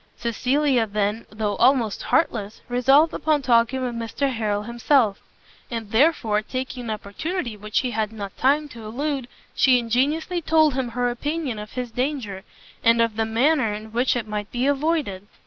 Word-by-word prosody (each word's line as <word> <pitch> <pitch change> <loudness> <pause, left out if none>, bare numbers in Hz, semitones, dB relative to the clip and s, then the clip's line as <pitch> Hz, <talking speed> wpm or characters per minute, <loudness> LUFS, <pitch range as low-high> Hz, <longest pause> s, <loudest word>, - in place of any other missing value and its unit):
Cecilia 250 +1 +1
then, 210 +2 -1
though 210 -1 -2
almost 240 -4 +3
heartless, 215 -9 0
resolved 270 +6 +4
upon 300 -2 +1
talking 245 +1 +3
with 245 -1 -2
Mr 235 +4 -2
Harrel 210 -3 -1
himself: 235 -1 +1 0.5
and 225 -3 -5
therefore, 225 -5 +3
taking 255 +2 -5
an - - -5
opportunity 225 - -4
which 210 +1 -1
he 255 -2 -2
had 220 -1 -1
not 200 -3 -7
time 290 +3 +2
to 230 -4 -11
elude, 270 +4 -3 0.3
she 260 -2 +4
ingenuously 285 +9 0
told 315 -2 +3
him 260 -1 -1
her 245 +1 -1
opinion 285 -2 -3
of 210 +1 -9
his 250 -2 -4
danger, 245 -7 -3 0.4
and 230 0 +5
of 230 -2 +2
the 225 0 0
manner 240 +2 +2
in 215 +1 -9
which 245 +3 +1
it 235 -3 -3
might 210 0 -4
be 245 +1 -1
avoided. 280 - 0
240 Hz, 165 wpm, -23 LUFS, 220-275 Hz, 0.5 s, and